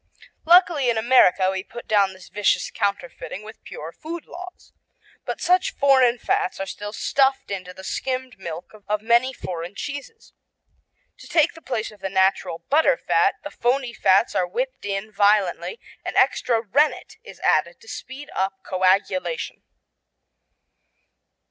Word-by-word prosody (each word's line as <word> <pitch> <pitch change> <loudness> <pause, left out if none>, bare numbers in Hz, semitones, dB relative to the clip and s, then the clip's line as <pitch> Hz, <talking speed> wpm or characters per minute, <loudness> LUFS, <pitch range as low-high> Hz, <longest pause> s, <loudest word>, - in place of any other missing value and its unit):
Luckily 335 -6 +5
in 235 - +1
America 190 -6 +4
we 190 0 -3
put 240 +3 -10
down 200 -3 +3
this 185 -1 -14
vicious 205 -1 +1
counterfeiting 200 -1 -3
with 220 +1 -12
pure 155 +2 -8
food 325 - -8
laws. 360 +1 -11 0.5
But - - -4
such 365 +1 +2
foreign 260 -4 +4
fats 395 - -1
are 195 - -2
still 205 +1 -6
stuffed 270 +2 +1
into 185 -2 -5
the 190 +1 -12
skimmed 255 +2 -3
milk 170 -2 -7 0.2
of 210 0 -1
many 235 +3 +3
foreign 175 -6 -6
cheeses. 290 - -7 0.9
To - - -12
take 325 0 +3
the 325 - -14
place 230 -7 -3
of 210 - -17
the 195 - -4
natural 190 -3 +1
butterfat 320 - +2
the - - -7
phony 245 0 0
fats 195 +2 +3
are 180 - +1
whipped 255 +7 -4
in 200 +1 -3
violently 205 - +2 0.2
and - - -5
extra 230 -2 +2
rennet 285 - +1
is 475 - -12
added - - +1
to 465 - -18
speed 280 - -8
up 190 0 -2
coagulation. 185 -2 0
220 Hz, 145 wpm, -23 LUFS, 190-275 Hz, 0.9 s, Luckily